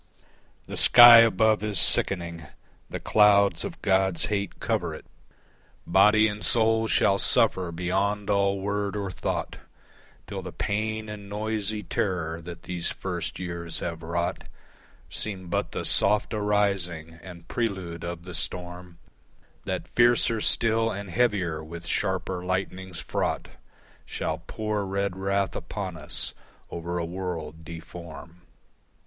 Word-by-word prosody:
The - - -6
sky 120 -1 +10
above 110 -2 +4
is 105 -2 -1
sickening, 85 -4 +3 0.4
the - - -5
clouds 100 -1 +4
of - - -6
God's 95 -2 +2
hate 100 -2 -3
cover - - -1
it, - - -12 0.8
Body 105 +4 +5
and 105 0 -5
soul 115 -1 +2
shall 100 -2 +3
suffer 90 -2 +2
beyond 95 +4 -1
all 100 -1 +1
word 100 +1 -2
or 100 -2 -3
thought, - - -3 0.7
Till - - -6
the - - -7
pain 110 +1 -2
and 105 -1 -8
noisy 105 0 -2
terror 85 -4 -2
that 85 0 -10
these 90 -2 -3
first 90 -3 -4
years 85 -2 -5
have 85 -1 -5
wrought 85 +1 -3 0.7
Seem 95 -4 -3
but - - -1
the - - -4
soft 105 +2 +4
arising 100 -6 -1
and 85 -2 -12
prelude 95 -8 -3
of 85 -1 -5
the 90 0 -9
storm 90 0 -6 0.7
That - - -4
fiercer 120 -2 +3
still 115 +1 +2
and 100 -3 -6
heavier 95 -9 0
with 85 +2 -9
sharper 90 -1 -1
lightnings 95 -1 -3
fraught - - -2 0.6
Shall - - -3
pour 105 -1 -3
red 100 0 -2
wrath 100 0 -1
upon 95 -4 -5
us 75 -1 -5 0.4
over 85 +1 -4
a 85 - -2
world 85 -3 -6
deform. 85 0 -10
95 Hz, 130 wpm, -26 LUFS, 85-105 Hz, 0.8 s, sky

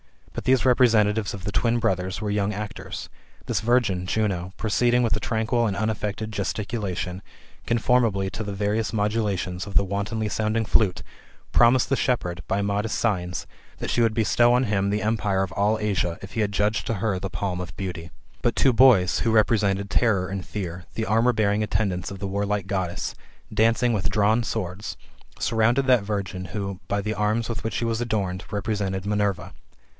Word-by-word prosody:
But - - -6
those 130 -1 +3
representatives 110 -5 +3
of 95 - -10
the 105 - -3
twin 115 +6 +1
brothers 95 -4 -1
were 105 -1 -2
young 105 0 0
actors. 105 +1 -6 0.4
This 110 -5 -1
virgin 110 -6 +1
[Juno], 95 -4 -1
proceeding 120 +3 +2
with 115 - +2
a - - -2
tranquil 115 +1 0
and 100 - -2
unaffected 110 0 -2
gesticulation, 100 -2 -3 0.5
conformably 115 -4 +2
to 110 - -4
the 100 -1 -5
various 105 +2 0
modula 105 -1 0
tions 90 +2 -4
of 100 - -9
the 100 - +5
wantonly 100 +3 -2
sounding 110 +2 0
flute, 105 -3 +2 0.5
promised 120 +1 +4
the 135 - +3
shepherd, 90 -11 -1
by 100 +1 0
modest 100 +2 -1
signs, 90 -5 -1 0.3
that - - -4
she 120 - +2
would 115 -2 +2
bestow 120 +2 +4
on 125 +1 +3
him 100 -4 0
the 105 +1 -1
empire 105 -3 +1
of 95 - -4
all 105 +3 +1
Asia, 100 -5 -1
if 95 - -8
he 110 - 0
adjuged 105 -1 0
to 115 - 0
her 100 -1 -1
the 95 - -4
palm 95 -1 -3
of 90 -1 -7
beauty. 90 -4 -5 0.3
But 120 - +1
two 135 - +4
boys, 115 -8 +5
who 115 - +1
represented 100 -3 +2
Terror 100 -6 +2
and 95 -1 -4
Fear, 90 -3 -6
the 110 - -1
armour 115 +4 +3
bearing 105 -1 +1
attendants 100 -4 -1
of 100 - -7
the 100 +1 -4
warlike 100 0 -1
Goddess, 95 -2 -2 0.4
dancing 115 +2 +3
with 100 -2 0
drawn 105 +2 +3
swords, 100 -2 -4 0.4
surrounded 115 +4 +2
that 125 -5 +4
virgin 100 -3 -3
who, 100 +1 -4
by 100 0 0
the 105 +2 -2
arms 110 +2 0
with 115 - -4
which 110 -4 -3
she 115 - -1
was 115 0 -1
adorned, 100 -5 -2
represented 100 -2 -2
Minerva. 105 -2 -1
105 Hz, 180 wpm, -24 LUFS, 95-110 Hz, 0.5 s, the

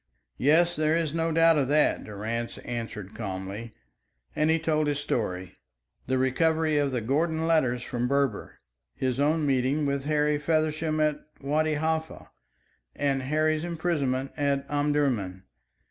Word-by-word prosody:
"Yes, 165 +5 +4
there 155 +1 +2
is 160 -3 -1
no 165 0 0
doubt 165 -1 +5
of 135 - +1
that," 150 +2 +2
Durrance 110 +3 -4
answered 115 -4 -5
calmly; 100 +2 -5 0.6
and 155 +1 +2
he 160 - +4
told 155 -1 0
his 145 -1 0
story 95 -10 -3 0.5
the 130 +1 +1
recovery 155 +4 +2
of 140 -1 +1
the 125 -2 -1
Gordon 160 +7 0
letters 130 -7 +2
from 120 0 -2
Berber, 140 -4 -1 0.4
his 130 0 -1
own 150 +2 +2
meeting 135 +2 +1
with 140 -1 -1
Harry 150 0 +1
Feversham 155 0 0
at 150 -1 +1 0.2
Wadi 155 +2 0
Halfa, 160 +1 -2 0.6
and 140 -2 0
Harry's 155 +3 +1
imprisonment 155 -6 -1
at 140 -1 0
Omdurman. 140 -11 0
145 Hz, 140 wpm, -27 LUFS, 130-155 Hz, 0.6 s, doubt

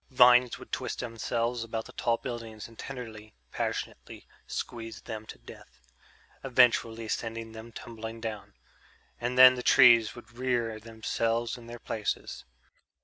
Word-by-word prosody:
Vines 125 -1 +6
would - - -13
twist - - -3
themselves 115 0 -2
about 110 -1 -4
the - - -11
tall 115 -1 0
buildings 115 -4 -7
and 115 -1 -18
tenderly, 110 -5 -8 0.2
passionately - - -4 0.2
squeeze 115 -4 -5
them 110 +1 -7
to - - -9
death... 65 +1 -14 0.6
eventually 115 -3 +3
send 115 +1 -3 0.2
them 110 +1 -10
tumbling 115 0 -8
down. 110 -3 -6 0.6
And 120 +1 -2
then 130 0 +10
the 125 - -4
trees 120 -4 +6
would 120 -2 -13
rear 120 -4 0
themselves 115 +1 -2
in 120 -2 -12
their 120 0 -8
places. 110 -2 -4
115 Hz, 140 wpm, -29 LUFS, 110-120 Hz, 0.6 s, then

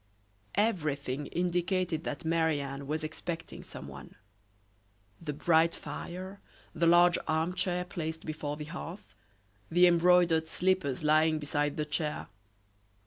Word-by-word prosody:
Everything 150 - 0
indicated 175 -1 0
that 150 +3 -4
Marie 160 -2 +2
Anne 140 0 -5
was 155 +2 -2
expecting 165 +1 -5
someone; 70 +1 -10 1.1
the 160 -3 -3
bright 160 +2 +3
fire, 185 +3 -7 0.3
the 170 0 +2
large 175 +1 +6
arm 160 +3 +1
chair 180 -1 -1
placed 160 -2 -5
before 150 -1 -4
the 150 - -6
hearth, 180 +4 -8 0.6
the 175 +2 +6
embroidered 170 -2 +4
slippers 180 -6 0
lying 155 +1 +4
beside 145 -1 -1
the 150 - 0
chair. 150 +1 -3
160 Hz, 120 wpm, -30 LUFS, 150-175 Hz, 1.1 s, large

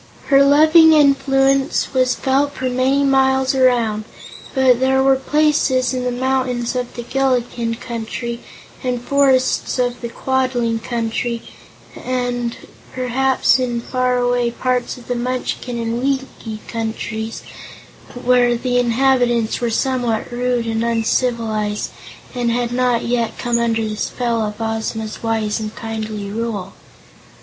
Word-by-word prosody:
Her 275 -1 +6
loving 315 +3 +6
influence 275 -2 +2
was 255 -1 +2
felt 275 +2 +1
for 260 - -3
many 260 +3 +2
miles 265 0 +3
around, 240 -5 +2 0.5
but 260 -2 +4
there 265 0 +2
were 270 0 +5
places 265 -2 +1
in 250 -1 -2
the 250 - 0
mountains 255 -1 -1
of 250 -1 -3
the 240 - -5
Gillikin 245 -3 -1
Country, 235 0 -5 0.4
and 250 -1 -1
the 240 - -10
forests 265 -2 +2
of 245 -1 -1
the 235 - -4
Quadling 250 -2 -1
Country, 230 0 -3 0.5
and 245 -2 -2 0.4
perhaps 260 +1 +2
in 240 -2 -1
far 255 +1 0
away 245 -1 +1
parts 250 +1 -2
of 245 - -14
the 245 - -1
Munchkin 250 0 -3
and 230 0 -2
Winkie 260 -5 -3
Countries, 225 0 -4 0.7
where 245 -1 +3
the 245 +1 0
inhabitants 245 -2 +2
were 240 - 0
somewhat 245 -1 -1
rude 245 -1 -1
and 225 0 -1
uncivilized 225 -2 -1 0.4
and 245 -1 -1
had 240 0 -1
not 245 -1 +1
yet 235 -1 -1
come 240 -1 0
under 225 -1 0
the 215 - -4
spell 235 0 -1
of 210 0 -4
Ozma's 220 -1 -3
wise 225 -2 -1
and 215 -1 -6
kindly 215 -2 -5
rule. 220 -3 -4
245 Hz, 135 wpm, -19 LUFS, 230-260 Hz, 0.7 s, Her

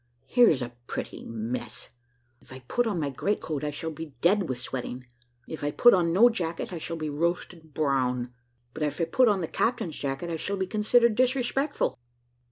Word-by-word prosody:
Here's 230 - +4
a 120 0 -7
pretty - - -5
mess! 115 +1 -5 0.5
if - - -20
I 130 0 -9
put 240 - 0
on 200 -6 -1
my 145 -3 -1
great 200 +10 -1
coat 150 -2 -4
I 150 - 0
shall 155 +2 -4
be 160 -2 -8
dead 185 +3 +3
with 130 - -2
sweating; 125 0 -5 0.4
if 160 - -7
I 145 - +1
put 240 +11 +6
on 175 -3 +3
no 205 +8 +7
jacket 175 -7 -2
I 170 - -4
shall 165 +1 -4
be 155 -1 -3
roasted 165 0 -3
brown; 125 -4 0 0.4
but - - -8
if 150 +2 -1
I 165 - +2
put 255 +8 +3
on 200 -3 +2
the 165 - -2
captain's 175 -8 -1
jacket 140 +5 -3
I 165 - -2
shall 200 +5 -3
be 190 - 0
considered 215 +4 +3
disrespectful." 255 - 0
165 Hz, 195 wpm, -27 LUFS, 135-205 Hz, 0.5 s, no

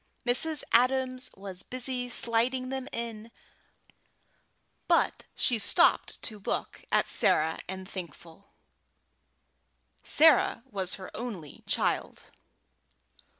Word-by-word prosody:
Mrs. 295 +5 +1
Adams 255 +1 +2
was 190 -2 -4
busy 255 +1 -3
sliding 245 +2 +1
them 265 -1 -4
in, 230 -1 -5 1.6
but - - +2
she 240 -3 +2
stopped - - +2
to 215 -3 -3
look 200 - -4
at - - +2
Sarah 160 +1 +1
and 190 0 -7
Thankful. 175 0 -10 1.6
Sarah 310 -6 +5
was 190 -2 -2
her 190 -1 -10
only 200 - -7
child. - - -2
230 Hz, 95 wpm, -28 LUFS, 190-255 Hz, 1.6 s, Sarah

